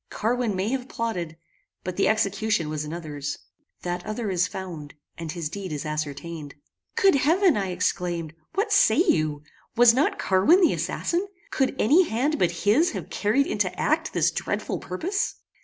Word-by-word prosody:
Carwin 230 -1 -1
may 190 +3 -1
have 260 0 -3
plotted, 175 -9 -3 0.5
but 185 0 -4
the 195 - +2
execution 215 -4 +1
was 155 -1 -3
another's. 150 -3 -5 0.5
That 175 0 -3
other 215 -1 -3
is 180 0 +2
found, 165 -6 -7 0.2
and 165 -2 -5
his 170 -2 -3
deed 190 +2 -6
is 150 +1 -4
ascertained." 150 0 -5 0.4
"Good 390 -1 +5
heaven!" 330 +6 +4
I 195 -2 -1
exclaimed, 175 -3 -2 0.2
"what 415 +2 +1
say 310 - +5
you? 155 - +2 0.3
Was 235 0 +7
not 270 +5 +1
Carwin 200 - +4
the 345 - +5
assassin? 355 +4 -1 0.2
Could 265 -1 +1
any 325 - +4
hand 280 +7 0
but 175 +1 0
his 270 +12 +4
have - - -6
carried 225 +7 +2
into 205 -7 0
act 315 +1 +1
this - - +2
dreadful - - -3
purpose?" 355 - -2
200 Hz, 160 wpm, -25 LUFS, 170-265 Hz, 0.5 s, Was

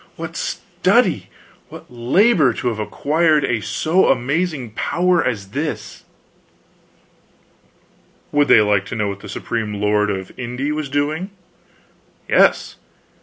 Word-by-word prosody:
"What - - -7
study, - - 0 0.4
what - - -11
labor, 140 - +3
to 125 - -2
have 110 -2 -4
acquired 150 - +1
a 120 -4 -1
so 165 - +1
amazing 135 0 -1
power 175 +10 +1
as 100 -6 -3
this!" 145 +8 -5 2.3
Would 145 0 +3
they 110 - +7
like 100 -2 +1
to - - -5
know 105 -2 -1
what 100 0 -6
the 105 - -11
Supreme 105 +1 -3
Lord 105 0 +1
of 95 -2 -4
Inde 125 +4 -3
was 150 -2 -4
doing? 150 +6 -1 1.0
Yes. - - +3
125 Hz, 120 wpm, -19 LUFS, 105-155 Hz, 2.3 s, they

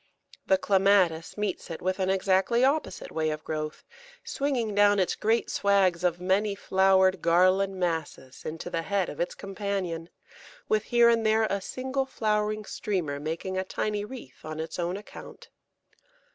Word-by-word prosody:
The 190 - +4
Clematis 190 -4 +2
meets 210 -3 -3
it 165 - -5
with 185 +1 -2
an 190 0 0
exactly 195 +5 +2
opposite 285 +3 -1
way 155 -1 0
of 155 0 -4
growth, 155 -1 -4 0.4
swinging 255 -6 -1
down 205 0 +5
its 185 -2 +1
great 225 +2 0
swags 190 -3 +2
of 175 -1 +1
many 195 +3 +1
flowered 190 -1 +3
garland 185 +3 +3
masses 160 -6 -3
into 160 +1 -6
the 165 - -1
head 195 +1 -1
of 145 - -8
its 175 - -2
companion, 195 -4 -4 0.6
with 215 -1 +1
here 240 -1 +4
and 230 -1 +2
there 220 0 +3
a 200 -2 -1
single 265 +5 -3
flowering 215 -2 -1
streamer 170 -11 -3
making 165 +5 -3
a - - -1
tiny 205 +2 -2
wreath 210 - -10
on 155 0 -6
its 160 +2 -5
own 175 +2 -1
account. 210 - -12
190 Hz, 160 wpm, -27 LUFS, 170-210 Hz, 0.6 s, down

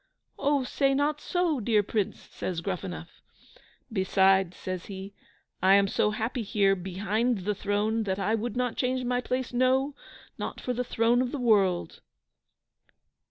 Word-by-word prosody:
"Oh, 285 -1 +2
say 275 +2 +1
not 295 +2 0
so, 355 -6 0
dear 215 -2 +2
Prince!" 205 -1 -2
says 175 -3 -4
Gruffanuff. 180 -2 -5 0.7
"Beside," 190 -2 +3
says 185 -1 -5
he, 195 0 -7 0.5
"I 190 +2 +6
am 200 0 +4
so 210 - +1
happy 225 +4 -2
here 200 -2 +2
behind 195 +4 -1
the 210 - +1
throne, 205 +3 0
that 190 -1 -1
I 205 +2 0
would 225 +1 -2
not 250 -2 -1
change 255 0 0
my 245 0 0
place, 255 0 -3
no, 260 +3 +2 0.5
not - - -4
for 250 - -2
the 250 +1 -1
throne 235 0 +2
of 250 -1 -1
the - - -3
world!" 200 -8 +2
220 Hz, 155 wpm, -28 LUFS, 195-250 Hz, 0.7 s, I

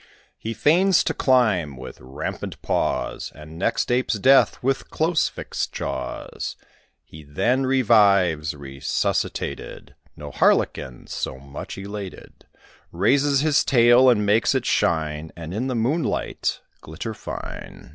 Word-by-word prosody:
He 115 +1 -5
feigns 180 +4 +4
to - - -1
climb, 105 - +2
with 65 0 -10
rampant 65 +2 -6
paws, - - -1
And 75 +2 -11
next 115 +5 0
apes 125 -1 +1
death, 130 +6 +4
with 135 +1 -1
close 160 0 +1
fixed - - -5
jaws. 65 -1 -5 0.5
He 80 - -13
then 125 - 0
revives, 100 - +3
resuscitated: 70 -1 -3 0.2
No - - -9
harlequin 65 -2 +1
so - - -4
much 70 +1 -9
elated: 100 -1 -9 0.4
Raises 135 +10 +2
his 150 -1 +3
tail, 120 +1 +5
and 105 -4 +3
makes 110 +6 +3
it 130 - 0
shine, 80 -1 0
And 85 0 -7
in 120 +6 -2
the 130 - -2
moonlight 135 +9 -1 0.2
glitter 80 +8 -6
fine. 110 - -8
105 Hz, 125 wpm, -23 LUFS, 80-130 Hz, 0.5 s, tail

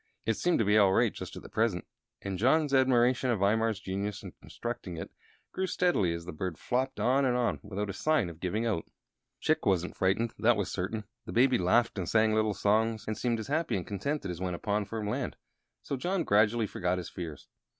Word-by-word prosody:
It 115 - +2
seemed 175 +10 +1
to 115 - +2
be 105 +2 +5
all 100 -2 +5
right - - +3
just - - -7
at - - -10
present, 110 -6 0 0.4
and 95 -2 -3
John's 145 +5 +3
admiration 130 -1 +3
of 115 -5 0
Imar's 110 +1 +2
genius 100 +2 -4
in 95 - -7
constructing 100 -7 -6
it - - -6 0.4
grew 190 0 -2
steadily 175 - +2
as 85 0 -5
the 90 - -5
bird 85 +1 -4
flopped 130 +2 -1
on 135 +3 +3
and 125 -2 +2
on 120 -1 0
without 105 0 -4
a 100 - -4
sign 155 - +1
of 85 -2 -9
giving 105 +6 -1
out. 105 -8 -1 0.6
Chick 155 +1 +1
wasn't 90 -2 +1
frightened, 100 +5 +1
that 115 0 +4
was 100 - -2
certain. 105 +4 -3 0.2
The - - -5
Baby 125 0 +4
laughed 110 +4 +2
and 90 - -3
sang 110 -1 +3
little 110 -1 +1
songs, 110 +3 +1
and 110 - -2
seemed 120 +1 -1
as 110 - -4
happy 155 -4 0
and 90 - -4
contented 100 +1 -3
as 85 0 -7
when 90 -1 -2
upon 105 +3 -1
firm 105 +1 -4
land; 105 - -2 0.5
so - - -3
John 175 +6 -1
gradually 105 +1 +3
forgot 90 -2 -1
his 90 - -5
fears. 80 -5 -7
110 Hz, 210 wpm, -30 LUFS, 95-120 Hz, 0.6 s, be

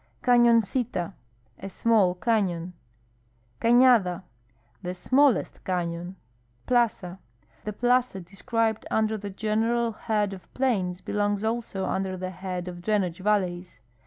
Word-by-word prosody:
CanoncUa. 235 -5 +3 0.2
— 115 -1 -37
A 195 - -6
small 195 -2 +2
canon. 180 -5 0 0.9
Canada. 230 -7 +4 0.3
— 120 +1 -38
The 180 0 -4
smallest 260 +4 +2
cafion. 175 0 -3 0.5
Plaza. 215 -7 0 0.2
— 115 - -34
The 210 - -3
plaza 245 -1 +1
described 220 +5 -2
under 220 0 +1
the 205 -1 -6
general 225 +3 0
head 210 -2 -1
of 185 - -12
plains 190 -9 0
belongs 205 0 -1
also 220 -4 -2
under 190 -1 -2
the 185 0 -4
head 185 -1 -5
of 175 -1 -7
drainage 190 -4 0
valleys. 185 - -1
195 Hz, 125 wpm, -26 LUFS, 180-230 Hz, 0.9 s, Canada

